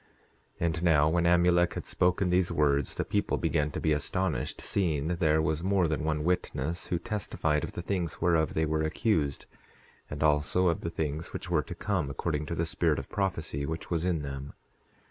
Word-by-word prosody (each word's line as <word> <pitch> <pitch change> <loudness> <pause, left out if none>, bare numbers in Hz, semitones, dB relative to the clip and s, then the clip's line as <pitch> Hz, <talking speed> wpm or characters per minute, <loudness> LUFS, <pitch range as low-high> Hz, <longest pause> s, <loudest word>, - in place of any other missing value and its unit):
10:12 - - 0
And 80 0 -1
now, 75 -4 +5
when 85 +1 +2
Amulek 85 0 +4
had - - -5
spoken 90 +1 +1
these 90 -1 +2
words 70 -2 +1
the - - -2
people - - 0
began 75 -2 0
to - - -5
be 80 - +1
astonished, 75 0 -1
seeing 80 -6 0
there 80 -3 +2
was 80 +1 -1
more 95 -2 +2
than 75 0 -1
one 75 -1 0
witness 85 -2 -1
who 90 - 0
testified 80 -6 -1
of - - -5
the 85 - -5
things 85 -3 -2
whereof 80 -2 +2
they 80 - +2
were 80 0 0
accused, 80 - 0 0.6
and 75 0 -3
also 75 +4 +3
of 85 - -1
the 85 - -3
things 80 -1 -3
which - - -5
were - - +3
to - - -8
come, 95 -9 -1
according 75 +2 -2
to 85 - -3
the 85 - 0
spirit 85 -2 +1
of 70 - -6
prophecy 80 -7 -2
which 80 +4 -5
was 85 -1 0
in 85 -4 0
them. 70 0 -6
80 Hz, 200 wpm, -29 LUFS, 75-90 Hz, 0.6 s, now